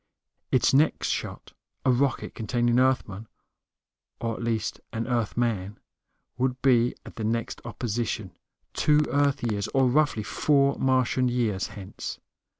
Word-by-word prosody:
Its 130 - +3
next 150 +3 +3
shot, - - -4 0.3
a 130 - +5
rocket 130 +2 0
containing 120 +2 +1
Earthmen, 115 -5 0 0.9
or 115 -1 -2
at - - -7
least 115 -2 -2
an 115 0 -3
Earthman, 115 -4 -1 0.6
would 130 0 0
be 125 -3 +4
at - - -12
the 110 - -3
next 115 +1 -2
opposition, 115 -4 -3 0.4
two 150 0 +3
Earth 140 -1 +2
years, 105 -4 -1
or 135 -1 +4
roughly 140 -4 +2
four 140 +3 +2
Martian 130 -1 +2
years, 115 -6 0
hence. 95 -2 -7
120 Hz, 130 wpm, -26 LUFS, 110-130 Hz, 0.9 s, a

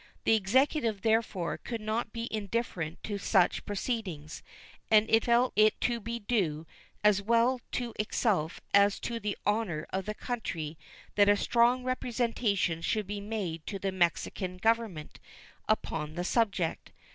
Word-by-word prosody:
The - - +4
Executive, 225 +1 +1
therefore, 220 -6 0
could 230 -1 -5
not 215 +1 -2
be 230 0 -4
indifferent 200 -6 -3
to 205 -2 -3
such 190 -2 +2
proceedings, 195 - -4 0.5
and 215 0 +5
it 225 0 +4
felt 240 +1 +3
it 215 +1 +4
to 240 -1 +1
be 230 +2 -4
due 190 -9 -1 0.4
as 210 -1 +4
well 235 +4 +2
to 240 -2 -2
itself 205 -6 0
as 200 0 +5
to 235 -1 -3
the 210 -2 -3
honor 205 -7 0
of 190 0 -1
the 215 - -3
country 170 -12 -4 0.4
that 205 -1 +5
a 205 - +5
strong 240 +4 +3
representation 230 -8 0
should 215 +4 0
be 205 +1 -5
made 200 -7 -4
to 200 - -3
the 195 0 -2
Mexican 185 +1 -1
Government 220 -6 -1 0.5
upon 155 -7 -1
the 175 - -2
subject. 200 -5 0
210 Hz, 145 wpm, -30 LUFS, 185-230 Hz, 0.5 s, and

